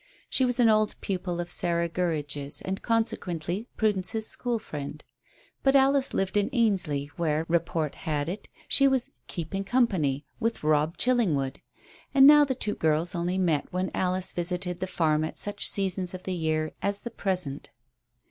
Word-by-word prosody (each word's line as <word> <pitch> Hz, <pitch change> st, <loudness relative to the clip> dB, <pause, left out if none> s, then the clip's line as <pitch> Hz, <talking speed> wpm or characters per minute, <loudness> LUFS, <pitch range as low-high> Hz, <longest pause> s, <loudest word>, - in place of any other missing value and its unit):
She 260 Hz, -, +3 dB
was 245 Hz, 0 st, -1 dB
an 240 Hz, -, +6 dB
old 215 Hz, -1 st, +2 dB
pupil 180 Hz, -2 st, -3 dB
of 175 Hz, 0 st, -4 dB
Sarah 170 Hz, -1 st, +1 dB
Gurridge's, 150 Hz, -5 st, -2 dB
and 190 Hz, +1 st, -4 dB
consequently 210 Hz, -4 st, -1 dB
Prudence's 215 Hz, 0 st, +1 dB
school 240 Hz, +1 st, 0 dB
friend. 150 Hz, -6 st, -7 dB, 0.6 s
But 270 Hz, 0 st, +3 dB
Alice 275 Hz, 0 st, +4 dB
lived 195 Hz, +1 st, 0 dB
in 205 Hz, -, +2 dB
Ainsley, 180 Hz, -, +1 dB
where, 160 Hz, -2 st, 0 dB
report 165 Hz, -2 st, 0 dB
had 150 Hz, -4 st, -3 dB
it, 185 Hz, +5 st, -6 dB, 0.2 s
she 275 Hz, -, +5 dB
was 265 Hz, -2 st, 0 dB, 0.2 s
"keeping 185 Hz, +3 st, -4 dB
company" 190 Hz, -, +1 dB
with 230 Hz, -5 st, -2 dB
Robb 155 Hz, +2 st, +1 dB
Chillingwood, 170 Hz, -, +1 dB, 0.5 s
and 270 Hz, -1 st, +8 dB
now 295 Hz, +1 st, +9 dB
the 265 Hz, -2 st, -1 dB
two 210 Hz, -4 st, -1 dB
girls 160 Hz, +3 st, +1 dB
only 175 Hz, +2 st, -1 dB
met 165 Hz, -6 st, 0 dB
when 185 Hz, +1 st, -2 dB
Alice 185 Hz, 0 st, 0 dB
visited 180 Hz, 0 st, -3 dB
the 185 Hz, -, -2 dB
farm 155 Hz, -4 st, +1 dB
at 160 Hz, -, -5 dB
such 205 Hz, 0 st, 0 dB
seasons 190 Hz, -2 st, 0 dB
of 185 Hz, -, -9 dB
the 185 Hz, -, -3 dB
year 155 Hz, -2 st, -1 dB
as 200 Hz, 0 st, +1 dB
the 235 Hz, -, -6 dB
present. 180 Hz, -10 st, -2 dB
180 Hz, 165 wpm, -27 LUFS, 160-215 Hz, 0.6 s, now